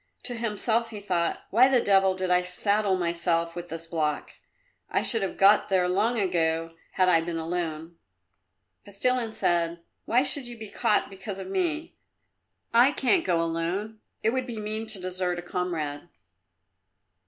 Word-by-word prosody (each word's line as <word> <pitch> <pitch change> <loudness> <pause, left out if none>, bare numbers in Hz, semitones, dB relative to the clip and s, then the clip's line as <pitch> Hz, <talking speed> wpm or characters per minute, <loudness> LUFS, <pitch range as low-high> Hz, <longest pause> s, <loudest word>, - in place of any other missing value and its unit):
To 245 - -5
himself 230 0 -1
he 215 - -7
thought, 180 -4 -1
"Why 250 +5 +6
the 260 -2 +4
devil 195 -3 +3
did 185 -1 -2
I 180 0 +4
saddle 200 +2 +1
myself 170 -1 0
with 175 0 -7
this 165 +1 -6
block? 155 -3 -2 0.6
I - - 0
should 225 -3 +4
have 195 - -3
got 200 +2 +5
there 185 -2 +2
long 210 +6 +1
ago 165 -3 0 0.2
had 185 - +3
I 170 -2 +4
been 165 0 -4
alone." 165 0 -4 0.9
Kostilin 230 +3 0
said, 170 -5 0 0.2
"Why 245 +3 +3
should 280 -2 +1
you 240 -1 -9
be 220 -2 -8
caught 210 - +1
because 195 +1 -7
of 190 -1 -7
me?" 330 - -1 0.8
"I 245 +4 +6
can't 310 +5 +2
go 170 -2 +1
alone; 175 +7 -3 0.2
it 225 - +3
would 260 +1 -2
be 235 -2 -6
mean 215 +1 -4
to 215 -3 0
desert 180 -1 -2
a 175 - -6
comrade." 165 -5 -3
190 Hz, 165 wpm, -26 LUFS, 170-220 Hz, 0.9 s, Why